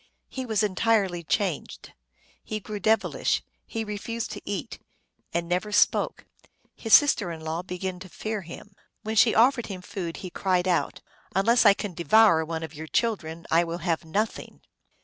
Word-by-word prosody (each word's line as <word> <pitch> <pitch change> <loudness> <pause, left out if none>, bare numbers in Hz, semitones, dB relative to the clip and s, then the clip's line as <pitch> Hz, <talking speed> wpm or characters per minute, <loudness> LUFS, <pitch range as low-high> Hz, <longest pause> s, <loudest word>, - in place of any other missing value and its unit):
He 260 -1 -5
was 220 -2 +1
entirely 200 -3 +1
changed; 180 -1 -2 0.5
he 215 - -4
grew 210 0 -6
devil 220 +2 +1
ish; - - 0 0.2
he 225 -1 -3
refused 220 +2 -4
to - - -7
eat, 200 -2 -5 0.5
and 170 0 -2
never 180 +4 -1
spoke. 205 - +2 0.5
His 225 - -6
sister 275 - +4
in 160 -1 -7
law 160 +2 -3
began 180 0 -5
to 185 0 -10
fear 215 +3 -4
him. 185 +4 -11 0.3
When 220 +1 -3
she 220 +1 +5
offered 240 +1 +4
him 185 -3 -7
food 180 -4 -5
he 180 - -6
cried 185 -1 0
out, 175 -2 0 0.2
" - - -30
Unless 230 +4 +4
I 200 - +7
can 200 -2 -5
devour 170 +1 +4
one 160 0 -4
of 160 -2 -7
your 160 +1 -8
chil 230 +6 +1
dren 165 -2 -10
I 165 +1 +5
will 170 0 -4
have 165 -2 0
nothing 205 +7 -3
195 Hz, 180 wpm, -26 LUFS, 170-220 Hz, 0.5 s, I